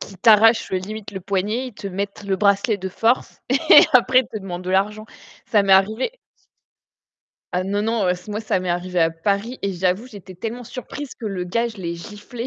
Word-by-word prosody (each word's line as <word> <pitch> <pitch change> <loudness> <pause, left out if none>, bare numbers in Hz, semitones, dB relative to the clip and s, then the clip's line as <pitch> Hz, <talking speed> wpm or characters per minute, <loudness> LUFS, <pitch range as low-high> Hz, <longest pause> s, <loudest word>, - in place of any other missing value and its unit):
Qui 195 - -9
t'arrachent, 225 +3 +5
heu, - - +2
limite 205 +3 -6
le 190 - -6
poignet, 205 +7 -1
ils 230 - -15
te 200 - -6
mettent 200 +2 -5
le 195 -1 -1
bracelet 200 +2 +2
de 190 -1 -5
force 225 +6 0
et 275 +5 +7
après, 255 0 +5
ils 260 - -8
te 215 - -5
demandent 185 -3 -6
de 185 - -4
l'argent. 210 +3 0 0.4
Ça 220 -5 +3
m'est 195 -1 +3
arrivé 220 - +2 1.4
Ah, 180 +1 0
non, 200 +2 -1
non, 225 -1 0
heu, 180 - +3
ç 180 +3 -14
moi, 210 +1 -3
ça 215 -4 -1
m'est 185 - -4
arrivé 180 +1 -2
à 165 0 +4
Paris 200 +9 -2
et 200 - -1
j'avoue, 185 +5 -1
j'étais 200 -6 -12
tellement 225 +7 -6
surprise 265 +3 -8
que 235 - -9
le 195 -4 -3
gars 230 +7 0
je 220 -3 -12
l'ai 170 -2 -4
giflé. 210 +7 -8
200 Hz, 215 wpm, -21 LUFS, 185-225 Hz, 1.4 s, et